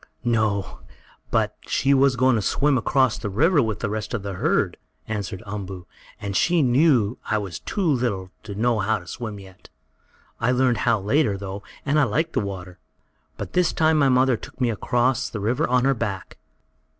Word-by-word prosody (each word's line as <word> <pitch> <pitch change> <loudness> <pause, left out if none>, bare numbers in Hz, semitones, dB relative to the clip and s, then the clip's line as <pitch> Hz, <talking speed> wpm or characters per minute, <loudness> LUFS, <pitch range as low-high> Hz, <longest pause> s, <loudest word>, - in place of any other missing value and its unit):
"No, 110 -5 0 0.5
but - - +1
she 140 +1 +2
was 135 -1 +4
going 130 0 +3
to 110 - +1
swim 145 +7 +2
across 130 0 +2
the 105 - -4
river 150 - +3
with 110 -4 -2
the - - 0
rest 110 +2 -3
of 105 - -4
the 100 -1 -4
herd," 90 - 0 0.3
answered 105 -1 -4
Umboo, 95 -3 -6 0.3
"and 100 -1 -4
she 170 - +3
knew 125 -4 +3
I 110 - +2
was 95 -5 -5
too 200 - -3
little 120 - 0
to 105 -2 -8
know 115 +1 +1
how 110 +2 +1
to 90 - -12
swim 110 +2 -6
yet. 95 -1 -15 0.7
I 120 +2 +2
learned 125 -2 +2
how 115 -2 +3
later, 105 +1 +1
though, 100 0 -6 0.2
and 145 +2 +2
I 145 - +4
liked 160 +4 -1
the - - +1
water. 95 -3 -6 0.6
But - - -6
this 180 -1 +2
time 160 -1 +3
my 140 -2 +4
mother 130 -1 +3
took - - -12
me 125 -3 +2
across 125 +3 0
the 110 - -5
river 120 +10 0
on 125 0 +3
her 135 - +4
back." 105 -6 -5
115 Hz, 190 wpm, -23 LUFS, 100-135 Hz, 0.7 s, was